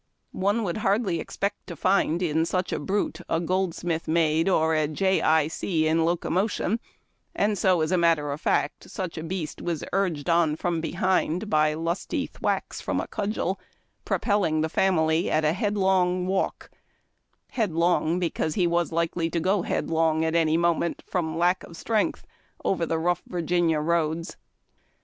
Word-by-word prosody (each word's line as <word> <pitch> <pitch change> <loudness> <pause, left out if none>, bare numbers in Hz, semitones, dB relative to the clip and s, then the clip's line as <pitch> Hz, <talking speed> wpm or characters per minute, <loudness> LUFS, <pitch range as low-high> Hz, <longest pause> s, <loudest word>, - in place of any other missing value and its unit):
One 205 +4 0
would 175 -2 -2
hardly 200 -4 +1
expect 200 +5 -4
to 170 - -6
find 185 0 +1
in 160 -1 +1
such 180 +2 -1
a - - -1
brute 200 +2 -2
a 165 - +1
Goldsmith 175 -2 -1
Maid 160 +1 +2
or 160 -3 +2
a 155 -1 +2
Jay 190 +5 +1
Eye 155 -1 +3
See 160 0 -1
in 160 +1 +2
locomotion, 185 +5 0 0.6
and 205 +1 +1
so 185 -2 +2
as 155 +2 0
a 185 - +3
matter 165 -4 +2
of 145 +3 -5
fact 145 - -1
such 185 -3 -5
a 160 - -5
beast 165 -2 -4
was 170 -3 -3
urged 180 -6 0
on 165 -3 +3
from 170 0 -1
behind 180 +3 0
by 155 0 +3
lusty 165 +3 -2
thwacks - - -3
from - - -1
a - - -2
cudgel, 200 -2 -2 0.4
propelling 195 -8 +1
the 160 - 0
family 160 -2 +2
at 155 0 +1
a 150 - +3
headlong 190 -2 +1
^valk 190 +1 -2 0.4
— - - -47
headlong, 175 -5 +1
because 165 -3 -1
he 180 - +2
was 170 0 +1
likely 165 0 0
to 170 - -1
go 190 +3 +1
headlong 160 -1 0
at 160 - 0
any 165 -1 +3
moment, 170 0 0
from 160 -3 -2
lack 175 +2 +2
of 170 - -11
strength, 220 +2 -1 0.4
over 170 -4 +1
the 165 - 0
rough 175 +2 0
Virginia 175 -2 +1
roads. 165 +1 -1
170 Hz, 165 wpm, -26 LUFS, 160-185 Hz, 0.6 s, Eye